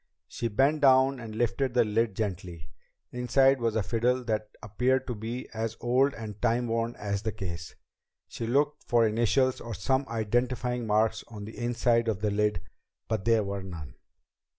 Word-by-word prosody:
She 120 Hz, -, -3 dB
bent 135 Hz, +8 st, +2 dB
down 135 Hz, -1 st, +5 dB
and 110 Hz, -3 st, -8 dB
lifted 120 Hz, +2 st, 0 dB
the 120 Hz, -, +5 dB
lid 110 Hz, -1 st, 0 dB
gently. 90 Hz, -7 st, -5 dB, 0.4 s
Inside 135 Hz, +2 st, +3 dB
was 115 Hz, -2 st, 0 dB
a 110 Hz, -, +1 dB
fiddle 125 Hz, +5 st, +1 dB
that 110 Hz, -2 st, -2 dB
appeared 125 Hz, +6 st, +1 dB
to 125 Hz, -, -3 dB
be 115 Hz, +3 st, -5 dB
as 110 Hz, 0 st, -3 dB
old 130 Hz, +4 st, +2 dB
and 105 Hz, -2 st, -8 dB
time 120 Hz, +1 st, +2 dB
worn 115 Hz, +1 st, -1 dB
as 100 Hz, -1 st, -3 dB
the 110 Hz, 0 st, -2 dB
case. 85 Hz, -4 st, -6 dB, 0.5 s
She 115 Hz, -, -5 dB
looked 145 Hz, +4 st, +1 dB
for 120 Hz, -1 st, +3 dB
initials 120 Hz, +4 st, +2 dB
or 115 Hz, -2 st, -6 dB
some 130 Hz, +7 st, 0 dB
identifying 120 Hz, +2 st, -1 dB
mark 110 Hz, +1 st, +2 dB
on 105 Hz, -3 st, -8 dB
the 110 Hz, -, -9 dB
inside 120 Hz, -1 st, +1 dB
of 110 Hz, -4 st, 0 dB
the 105 Hz, -1 st, 0 dB
lid, 105 Hz, -3 st, +1 dB, 0.5 s
but 110 Hz, -3 st, -2 dB
there 115 Hz, -2 st, +4 dB
were 100 Hz, 0 st, -4 dB
none. 80 Hz, -9 st, -8 dB
115 Hz, 175 wpm, -28 LUFS, 105-125 Hz, 0.5 s, down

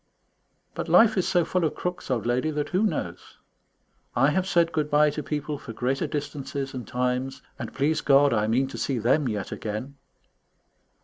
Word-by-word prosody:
But -, -, -4 dB
life 225 Hz, -1 st, +6 dB
is 185 Hz, -, +1 dB
so 175 Hz, -3 st, +2 dB
full 185 Hz, -1 st, 0 dB
of 155 Hz, -, 0 dB
crooks, 180 Hz, 0 st, -4 dB
old 120 Hz, -4 st, -1 dB
lady, 125 Hz, +5 st, +1 dB
that 150 Hz, -1 st, -2 dB
who 185 Hz, +2 st, +1 dB
knows? -, -, -5 dB, 0.8 s
I -, -, +4 dB
have 190 Hz, 0 st, 0 dB
said 170 Hz, -2 st, +3 dB
good 155 Hz, -2 st, -1 dB
bye 150 Hz, 0 st, +4 dB
to 150 Hz, -, -4 dB
people 150 Hz, -1 st, -3 dB
for 115 Hz, -, -8 dB
greater 130 Hz, +4 st, -1 dB
distances 140 Hz, -2 st, -4 dB
and 125 Hz, -2 st, -6 dB
times, 125 Hz, +1 st, -2 dB, 0.2 s
and, 120 Hz, -4 st, -5 dB
please 150 Hz, +3 st, 0 dB
God, 140 Hz, -1 st, +5 dB
I 105 Hz, -1 st, +1 dB
mean 125 Hz, +5 st, +2 dB
to -, -, -7 dB
see 135 Hz, -, -1 dB
them 125 Hz, +6 st, +2 dB
yet 105 Hz, -3 st, -4 dB
again. 110 Hz, +6 st, -5 dB
140 Hz, 185 wpm, -26 LUFS, 125-155 Hz, 0.8 s, life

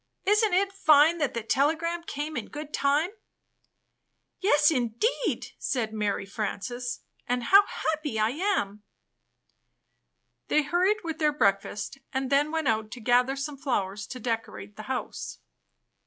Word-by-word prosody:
Isn't 420 Hz, -1 st, +3 dB
it 390 Hz, +1 st, +1 dB
fine 315 Hz, -2 st, +5 dB
that 290 Hz, -5 st, -1 dB
the 230 Hz, -, -2 dB
telegram 320 Hz, +8 st, +1 dB
came 305 Hz, -1 st, -5 dB
in 230 Hz, -, -4 dB
good 300 Hz, 0 st, -8 dB
time!" 290 Hz, +6 st, +2 dB, 1.3 s
"Yes, 300 Hz, -6 st, +4 dB
indeed!" 275 Hz, -, -1 dB
said 225 Hz, -5 st, -1 dB
Mary 210 Hz, -2 st, -1 dB
Frances. 240 Hz, +4 st, -4 dB, 0.3 s
"And 245 Hz, 0 st, 0 dB
how 395 Hz, +10 st, +6 dB
happy 305 Hz, -6 st, -2 dB
I 215 Hz, +1 st, +2 dB
am." 260 Hz, -, -1 dB, 1.7 s
They 305 Hz, -, +3 dB
hurried 370 Hz, +8 st, +1 dB
with 325 Hz, -2 st, -4 dB
their 305 Hz, -1 st, +3 dB
breakfast, 205 Hz, 0 st, 0 dB
and 265 Hz, 0 st, -2 dB
then 285 Hz, +2 st, +3 dB
went 320 Hz, -2 st, -1 dB
out 220 Hz, -1 st, +1 dB
to 250 Hz, -, -8 dB
gather 245 Hz, +3 st, +3 dB
some 280 Hz, +1 st, -5 dB
flowers 205 Hz, -7 st, -2 dB
to 255 Hz, -, -7 dB
decorate 220 Hz, -, -4 dB
the -, -, -8 dB
house. -, -, -4 dB
280 Hz, 140 wpm, -27 LUFS, 225-320 Hz, 1.7 s, how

